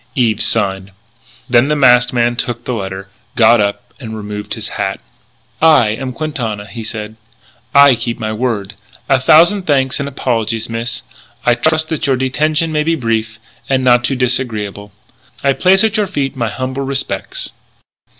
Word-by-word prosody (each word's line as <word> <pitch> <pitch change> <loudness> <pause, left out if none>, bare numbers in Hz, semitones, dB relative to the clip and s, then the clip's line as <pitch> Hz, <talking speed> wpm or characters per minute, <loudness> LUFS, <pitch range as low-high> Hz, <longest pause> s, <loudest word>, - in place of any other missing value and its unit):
Eve 115 -4 +1
signed. 95 -1 0 0.6
Then 120 0 +4
the 150 - +1
masked 125 -3 +4
man 120 -1 +1
took 120 -1 -4
the 125 - -2
letter, 95 -2 -5 0.3
got 115 0 +5
up, 100 0 -3
removed 105 -3 -6
his - - -5
hat. - - -3 0.6
"I 155 -9 +5
am 130 +4 -3
Quintana," 125 -8 -4
he 115 +1 -8
said. 110 0 -6 0.5
"I 140 -1 +7
keep 115 0 -3
my 110 -1 -3
word. 110 -3 -2 0.3
A 135 -2 +2
thousand 175 +8 +4
thanks 135 -3 +1
and 140 0 -3
apologies, 115 -4 -2
miss. 115 +1 -4 0.4
I 120 - +5
trust 160 +4 +1
that 160 -3 -2
your 135 - +3
detention 155 +5 0
may 150 -1 +1
be 165 +2 +1
brief 110 -4 -2 0.3
and 130 -1 +1
not 120 -1 +4
too 135 - 0
disagreeable. 110 -5 -2 0.5
I 140 0 +3
place 190 +7 +3
at 220 0 +1
your 210 -2 +1
feet 140 -5 -2
my 120 -3 -1
humble 130 +2 -4
respects." 135 0 -4
125 Hz, 160 wpm, -15 LUFS, 110-140 Hz, 0.6 s, I